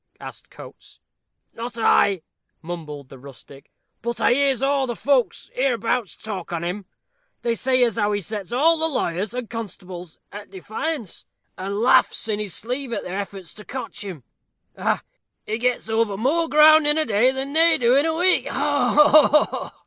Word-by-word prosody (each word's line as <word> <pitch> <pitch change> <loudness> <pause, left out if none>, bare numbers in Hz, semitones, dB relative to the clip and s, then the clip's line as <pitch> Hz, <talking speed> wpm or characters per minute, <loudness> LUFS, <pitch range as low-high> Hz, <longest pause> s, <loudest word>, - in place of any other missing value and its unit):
asked - - -11
Coates. - - -14 0.5
"Not 235 +1 -7
I," 200 -5 +3 0.4
mumbled 150 -5 -7
the 135 - -13
rustic; 135 +1 -14 0.3
"but 235 0 -4
I 235 - +3
hears 270 -1 +1
aw 275 -1 +1
the 240 - -3
folks 265 -2 0
hereabouts 240 -4 -1
talk 200 -6 -7
on 170 -1 -3
him. 185 +3 -4 0.6
They 235 - +1
say 255 +2 +1
as 230 -3 0
how 210 -1 +1
he 205 - 0
sets 205 -1 -6
all 315 +7 +3
the 320 0 +2
lawyers 200 - -2
and 250 -2 -4
constables 185 -6 -8
at 205 0 -10
defiance, 220 - -5 0.3
and 195 +2 -4
laughs 240 -1 +3
in 210 -1 -1
his 205 -4 -3
sleeve 250 +3 -3
at - - -3
their 185 +2 -4
efforts 195 -3 -7
to 210 - -11
cotch 260 -3 -7
him 180 -10 -8 0.5
ha, - - -14
ha! - - 0 0.4
He 220 +2 -3
gets 250 -1 -1
over 220 -3 0
more 315 +9 0
ground 305 +1 +6
in 295 +1 +4
a 315 - +1
day 225 +3 +3
than 265 +1 -4
they 330 +1 +4
do 240 +1 +3
in 285 +4 +3
a 320 - -1
week 365 +3 +3
ho, - - 0 0.6
ho!" - - -6
230 Hz, 180 wpm, -22 LUFS, 195-265 Hz, 0.6 s, ground